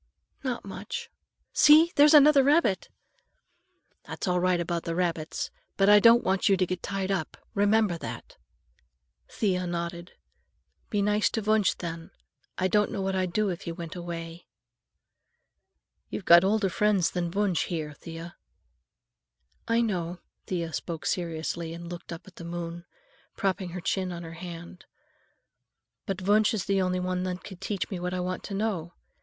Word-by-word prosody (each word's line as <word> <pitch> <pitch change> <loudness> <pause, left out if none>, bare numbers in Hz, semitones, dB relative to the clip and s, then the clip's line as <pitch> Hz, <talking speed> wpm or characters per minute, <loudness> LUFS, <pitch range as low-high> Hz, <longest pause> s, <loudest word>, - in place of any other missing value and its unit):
"Not 250 -5 -3
much. 475 - -6 0.4
See, 310 +3 +7
there's 295 +2 +7
another 295 -1 +8
rabbit!" 285 - +2 1.2
"That's - - -5
all 180 0 +2
right 180 0 +2
about 170 0 -2
the 165 - -3
rabbits, 165 -3 -2 0.3
but 195 0 +4
I 210 0 +8
don't 230 +3 +6
want 190 +2 +2
you 195 - +4
to 185 - +2
get 180 0 -4
tied 195 -1 -2
up. 185 -5 -2 0.2
Remember 205 -3 +2
that." - - -8 0.9
Thea 185 -4 0
nodded. 170 0 -4 0.8
"Be 205 -1 0
nice 210 +1 +2
to 225 - -2
Wunsch, 215 -2 +3
then. 165 -1 -6 0.5
I 185 - +1
don't 210 +2 +2
know 195 - -3
what 190 0 -1
I'd 185 -1 0
do 210 +2 +1
if 175 -2 -4
he 170 - -5
went 165 0 -7
away." 170 -1 -7 1.6
"You've 195 - -5
got 170 +1 +8
older 200 0 +2
friends 200 -1 +2
than 175 -1 -2
Wunsch 195 -2 0
here, 155 -4 -4
Thea." 165 +3 -9 1.3
"I 230 +1 +3
know." 180 -6 -2 0.3
Thea 170 -3 -3
spoke 165 +2 -5
seriously 165 -1 -2
and 170 0 -8
looked 175 0 -8
up 165 +3 -8
at 190 - -16
the - - -8
moon, 170 0 -6 0.5
propping 190 -3 -1
her 180 +1 -6
chin 185 +1 -1
on 170 0 -6
her 165 0 -8
hand. 175 +1 -9 1.2
"But 195 -2 -3
Wunsch 210 +4 +3
is 200 - -2
the 195 -1 +1
only 185 0 0
one 180 0 -1
that 180 0 -4
can 190 - -9
teach 195 +1 -3
me 185 - -3
what 180 +1 -3
I - - -2
want 180 0 -3
to 200 - -5
know. 190 -5 -2
185 Hz, 165 wpm, -27 LUFS, 170-205 Hz, 1.6 s, another